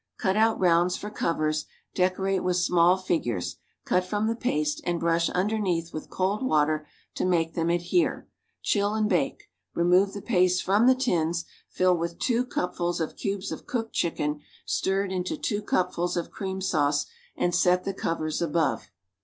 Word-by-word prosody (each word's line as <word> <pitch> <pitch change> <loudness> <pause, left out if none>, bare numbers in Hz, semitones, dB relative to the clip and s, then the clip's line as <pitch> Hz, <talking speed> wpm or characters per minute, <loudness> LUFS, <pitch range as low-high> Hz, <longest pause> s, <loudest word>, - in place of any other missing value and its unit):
Cut 190 -3 0
out 220 +1 +3
rounds 175 0 +3
for 210 - -7
covers; 155 -5 -1 0.3
decorate 190 +1 +1
with 180 -1 +1
small 180 0 +4
figures, 140 - -2 0.3
cut 180 - +2
from 205 +3 -1
the 225 +1 0
paste 150 -11 -1
and 175 -1 -1
brush 165 0 +2
underneath 185 -4 -1
with 155 - -6
cold 190 +3 -1
water 155 - +1 0.3
to - - -3
make 165 -3 +1
them 165 0 0
adhere. 175 - +1 0.4
Chill 205 0 +1
and 215 -1 +1
bake. 175 -9 0 0.3
Remove 180 +3 +3
the 200 - -6
paste 180 -4 +2
from 205 +5 +3
the 260 - +6
tins, 170 -9 0 0.2
fill 185 0 +2
with 170 0 -3
two 245 -1 +1
cupfuls 175 -4 -2
of 160 - -3
cubes 195 -1 -3
of - - -7
cooked 235 -5 -3
chicken 150 -3 -1 0.3
stirred 195 0 0
into 185 - -2
two 210 -7 -2
cupfuls 180 -3 0
of 170 - -3
cream 190 -2 -4
sauce 145 -6 +1 0.3
and 175 - +1
set 180 +1 +3
the 195 - -2
covers 160 -4 -2
above. 165 -1 0
180 Hz, 165 wpm, -26 LUFS, 170-200 Hz, 0.4 s, the